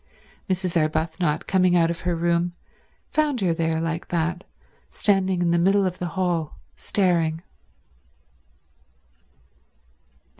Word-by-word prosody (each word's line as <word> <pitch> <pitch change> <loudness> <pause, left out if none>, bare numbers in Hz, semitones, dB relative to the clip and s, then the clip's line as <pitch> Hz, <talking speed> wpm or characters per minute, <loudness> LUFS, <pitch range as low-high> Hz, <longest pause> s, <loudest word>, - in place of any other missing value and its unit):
Mrs. 185 -1 -1
Arbuthnot, 160 0 0
coming 185 -2 +3
out 170 -1 +3
of 170 - -5
her 175 0 -1
room, 170 +1 0 0.6
found 300 -4 +1
her 180 -3 +2
there 160 -1 0
like 165 0 -3
that, 175 +1 -1 0.5
standing 190 -3 +1
in 170 - +2
the 170 - +3
middle 195 +3 +3
of 185 -1 -3
the 180 - -2
hall 175 -4 -1 0.2
staring. 170 -4 0
175 Hz, 115 wpm, -24 LUFS, 165-185 Hz, 0.6 s, coming